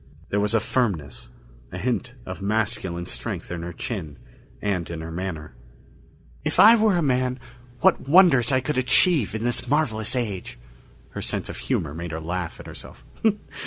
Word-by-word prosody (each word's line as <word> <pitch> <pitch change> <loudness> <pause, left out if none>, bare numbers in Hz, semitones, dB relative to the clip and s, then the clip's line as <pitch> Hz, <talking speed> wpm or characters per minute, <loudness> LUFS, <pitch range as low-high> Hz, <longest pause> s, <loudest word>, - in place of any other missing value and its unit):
There 105 - +1
was 105 +2 +1
a - - +5
firmness, 80 - -2 0.4
a - - -6
hint 125 0 -2
of 95 +1 -7
masculine 100 -4 -1
strength - - -5
in 85 -1 -4
her 85 +1 -5
chin 80 - -5 0.4
and 95 -5 -2
in 85 -2 -5
her 80 +1 -6
manner. 80 -5 -5 0.9
"If - - -1
I 225 +3 +10
were 215 -3 +3
a 170 - +1
man, 130 -2 +1 0.4
what 135 - +3
wonders 150 -8 +6
I 130 -1 +3
could 135 0 -1
achieve 130 - +3
in 110 - -3
this 120 +1 -1
marvelous 130 -5 0
age!" 105 -7 -3 0.5
Her - - -5
sense - - -3
of - - -6
humor 60 +3 -2
made 85 +2 -5
her 80 - -3
laugh 85 +2 -4
at - - -10
herself. - - -11
105 Hz, 170 wpm, -24 LUFS, 85-130 Hz, 0.9 s, I